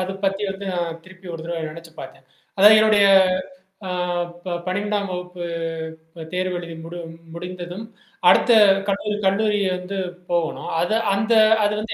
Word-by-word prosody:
அத 185 +1 -2
பத்தி 195 +1 0
வந்து 195 +1 -7
நான் 170 -2 -3
திருப்பி 185 0 -16
ஒரு 160 - -7
தடவ 170 -1 -4
நெனைச்சு 165 +1 -12
பார்த்தேன். - - -11 0.3
அதாவது 210 +3 +8
என்னுடைய 210 -2 +5 0.8
ஆ - - -2 0.5
ப 175 - -2
12ஆம் 200 +2 -1
வகுப்பு 180 0 -6 0.7
ப 165 -1 -8
தேர்வு 185 0 -1
எழுதி 170 -1 -8
முடி 170 +1 -8 0.4
முடிந்ததும், 180 +3 -7 0.4
அடுத்த - - +5 0.4
கல்லூரி 205 +1 -1
கல்லூரி 205 +2 +2 0.2
வந்து 180 +2 -6 0.3
போகணும். 170 -2 -1
அது 195 +5 +1 0.2
அந்த 215 +4 +1 0.3
அது 210 0 +2
வந்து 220 +1 -4
185 Hz, 145 wpm, -22 LUFS, 175-205 Hz, 0.8 s, அதாவது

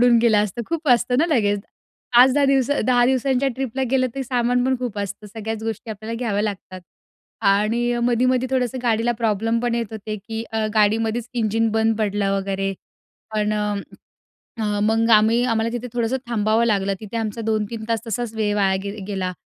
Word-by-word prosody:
उडून 240 -1 +5
गेलं 225 -2 +4
असतं, 210 +4 -5
खूप 325 -2 -3
असतं 245 +1 +3
ना 325 - +3
लगेज. 210 -10 +2 0.6
5-10 260 +3 +6
दिवस 270 -1 +2 0.2
10 245 -1 +4
दिवसांच्या 265 +1 +1
ट्रिपला 265 0 -3
गेलंतर 260 0 0
सामान 245 -1 +1
पण 260 0 +1
खूप 240 -5 -4
असतं, 200 +1 -5
सगळ्याच 220 +1 -5
गोष्टी 225 0 -4
आपल्याला 220 +2 -6
घ्याव्या 210 -4 -1
लागतात. 190 -3 -5 0.6
आणि 210 +4 +2 0.2
मधी-मधी 250 +1 +2
थोडंसं 255 -1 0
गाडीला 235 0 +1
प्रॉब्लेम 225 0 0
पण 240 -1 0
येत 235 -1 -1
होते, 215 0 -5
की 220 +2 -6
अ, 220 -1 0
गाडीमध्येच 220 +2 +1
इंजिन 225 0 +1
बंद 220 0 +1
पडलं 205 -2 0
वगैरे, 195 0 -2 0.6
पण 210 0 +1
अ, 210 -1 -1 1.1
मग 225 +2 +2
आम्ही 225 +3 +3
आम्हाला 230 -2 +1
तिथे 245 +1 -4
थोडंसं 240 +2 0
थांबावं 220 0 +2
लागलं. 200 -3 +1
तिथे 215 +1 -6
आमचा 225 0 -3
2-3 220 0 -2
तास 230 -1 0
तसाच 230 0 -3
वेळ 210 -2 0
वाया 195 -2 +2
गे 200 +1 -5
अ, - - -7
गेला. 190 -3 -2
225 Hz, 175 wpm, -22 LUFS, 210-245 Hz, 1.1 s, 5-10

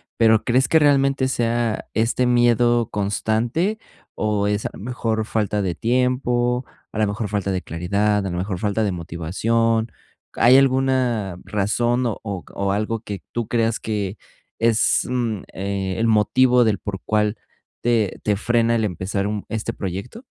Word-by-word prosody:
Pero 110 -1 +4
¿crees 130 +2 +2
que 160 - +5
realmente 140 -2 +3
sea 120 -3 -1
este 115 +3 +1
miedo 120 -1 +3
constante 110 - 0 0.4
o 105 -1 0
es 105 0 -1
mejor 110 -1 -2
falta 105 -2 -1
de 90 -3 -2
tiempo, 125 0 +1 0.3
a - - -6
lo 110 - +3
mejor 105 +2 -3
falta 100 -1 -2
de 95 -1 -1
claridad, 100 +5 0
a - - -2
la 90 - -3
mejor 95 0 -2
falta 105 +2 0
de 100 -3 0
motivación? 110 +8 -1 0.4
¿Hay 125 +2 +5
alguna 130 -8 +1
razón 120 +5 0
o 115 - -1 0.3
c - - -16
o 100 0 0
algo 110 +2 -1
que 100 -3 -6
tú 120 -2 -2
creas 115 -1 +1
que 105 -2 -3 0.4
es, 115 -1 +3
mm, 120 -5 -1
eh, 95 -1 -3
el 115 - +2
motivo 125 +4 +4
del 110 -4 +1
por 95 -3 -5
cual 105 0 +1 0.5
te 115 -5 +1
te 105 - +1
frena 115 +2 +1
el 110 -1 +1
empezar 100 +1 -2
un 105 -1 -3
este 110 +1 -3
proyecto? 100 - -6
110 Hz, 155 wpm, -22 LUFS, 100-120 Hz, 0.5 s, que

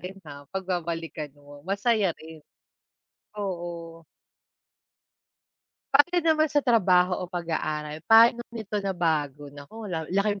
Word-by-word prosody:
rin, 185 +3 -8
ha, 145 -2 -11
'pag 190 +4 -4
babalikan 165 -4 -3
mo, 145 0 -14
masaya 200 +2 +1
rin. 160 0 -12 1.0
Oo. 170 -3 -6 1.9
Pagdating 340 +5 +4
naman 310 0 +2
sa 290 -1 +1
trabaho 185 -7 +4
o - - -9
pag-aaral, 155 -3 -3
pa'no 230 +1 +7
nito 220 -3 -5
nabago? 155 -7 -1
Naku, 145 +11 -10
lal 160 -2 -3
laking 200 +2 0
180 Hz, 115 wpm, -26 LUFS, 160-210 Hz, 1.9 s, pa'no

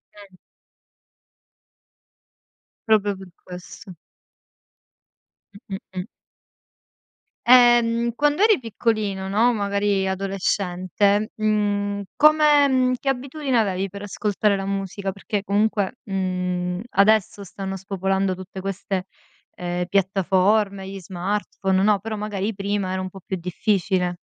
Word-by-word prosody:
Mh. 200 -2 -15 2.5
Proprio 205 -2 +3
per 190 -1 -12
questo. 180 +1 -10 1.7
Mh, 195 - -4
mh, - - -3 0.2
mh. 180 - -2 1.4
Ehm, 240 -1 +5
quando 295 +5 +1
eri 430 -4 +5
piccolino, 215 -4 -2
no, 225 +5 +3
magari 200 -2 0
adolescente, 195 +2 0
mhmm, 205 -1 0
come 300 -1 +5
mhmm, 255 -1 +2
che 275 - -1
abitudine 270 0 -1
avevi 195 -3 0
per 200 +2 -9
ascoltare 205 0 0
la 195 - -3
musica, 195 0 -3
perché 200 +1 -4
comunque, 205 +2 0
mhmm, 180 -2 -2
adesso 200 0 +3
stanno 195 0 -6
spopolando 195 0 -1
tutte 185 +1 -9
queste, 195 0 -3 0.5
ehm, 175 0 -3
piattaforme, 195 +1 +1
gli 195 0 -7
smartphone, 190 +1 -2
no; 205 -1 +3
però 215 +2 -5
magari 210 0 -3
prima 200 -1 -2
era 185 0 -2
un 185 - -4
po' 195 +1 -12
più 190 - -3
difficile. 180 0 0
200 Hz, 110 wpm, -23 LUFS, 190-215 Hz, 2.5 s, Ehm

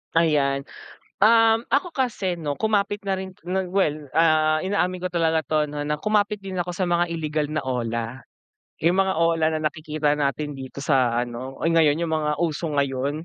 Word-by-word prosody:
Ayan. 140 -4 +2 0.6
Um, 225 +1 +5
ako 285 +6 +2
kasi, 225 - -1
'no, 155 -4 -3
kumapit 205 -1 +1
na 195 -1 -1
rin, 190 0 -6 0.2
nag 185 -1 -2
well, 155 -6 0
ah, 155 -1 +3
inaamin 185 -1 -1
ko 185 - -1
talaga 165 -2 +1
to, 155 +2 0
'no, 145 0 -6
na 150 +1 -1
kumapit 210 +4 +1
din 190 -1 -5
ako 175 0 -2
sa 185 - 0
mga 175 0 +1
illegal 155 -2 -1
na 155 +1 -3
OLA. 120 -1 -3 0.6
Yung 175 +3 +4
mga 190 -2 +1
OLA 165 -1 +2
na 155 - -4
nakikita 155 -2 -1
natin 145 0 -1
dito 135 -1 -9
sa 125 -4 +2
ano, 125 +2 -7
uy! 165 - 0
Ngayon 155 -3 +4
yung 160 - -3
mga 150 -1 0
uso 165 0 -1
ngayon. 140 +1 -1
160 Hz, 180 wpm, -24 LUFS, 145-185 Hz, 0.6 s, Um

